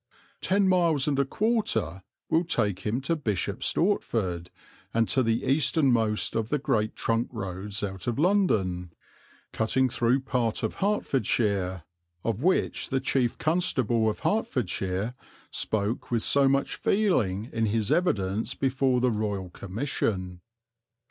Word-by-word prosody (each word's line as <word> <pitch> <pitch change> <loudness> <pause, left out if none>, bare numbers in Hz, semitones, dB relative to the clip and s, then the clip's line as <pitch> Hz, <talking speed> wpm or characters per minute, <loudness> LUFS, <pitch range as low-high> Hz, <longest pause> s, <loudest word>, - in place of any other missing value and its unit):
Ten 195 +1 +2
miles 170 -7 +3
and 140 -2 +1
a 140 - +3
quarter 215 - 0 0.3
will 165 +2 +2
take 105 - 0
him 110 +6 -2
to 150 +5 0
Bishop's 105 - -1
Stortford 100 - 0 0.5
and 115 -1 +3
to 130 - +2
the 115 -1 0
easternmost 130 -6 +2
of 110 0 -1
the 150 - +1
great 110 -6 0
trunk 115 +1 0
roads 100 -1 -4
out 95 0 -5
of 120 - -1
London, 110 - +1 0.6
cutting 130 +4 +1
through 120 +3 +1
part 125 -5 -1
of 110 - -1
Herts, 105 - 0 0.4
of 115 0 -1
which 185 +4 +1
the 135 - +1
Chief 130 -2 0
Constable 130 -9 +1
of 105 - -5
Hertfordshire 110 - -1 0.4
spoke 110 +1 -1
with 115 -2 0
so 140 -1 +4
much 140 +1 0
feeling 120 - +1
in 115 -1 +1
his 105 0 0
evidence 110 - 0
before 130 -2 +1
the 125 -1 +3
Royal 105 -4 -3
Commission. 95 -4 -3
115 Hz, 135 wpm, -27 LUFS, 100-140 Hz, 0.6 s, so